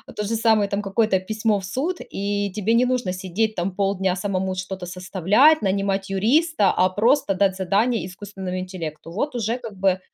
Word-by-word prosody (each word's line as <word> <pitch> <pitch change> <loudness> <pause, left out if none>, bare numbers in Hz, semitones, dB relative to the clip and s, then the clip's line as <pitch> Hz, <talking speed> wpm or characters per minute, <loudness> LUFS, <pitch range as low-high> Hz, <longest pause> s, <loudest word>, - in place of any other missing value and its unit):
то 210 - -2
же 220 +3 -1
самое, 220 -3 +3
там, 200 +1 -2
какое-то 195 0 +1
письмо 215 +2 0
в 190 - -7
суд, 285 - -2
и 200 0 -3
тебе 215 +3 +1
не 245 +2 +4
нужно 250 -6 0
сидеть, 190 +4 -2
там, 180 +2 -1
полдня, 195 -2 0
самому 190 0 -2
что-то 185 0 -5
составлять, 190 - +3
нанимать 195 0 -1
юриста, 230 - +3
а, 185 - +2
просто 220 +4 +2
дать 190 0 +2
задание 200 +2 +1
искусственному 185 0 -6
интеллекту. 170 -4 -6
Вот, 270 - -2
уже, 230 0 -1
как 230 -4 -9
бы 190 -1 +2
200 Hz, 180 wpm, -23 LUFS, 185-220 Hz, -, не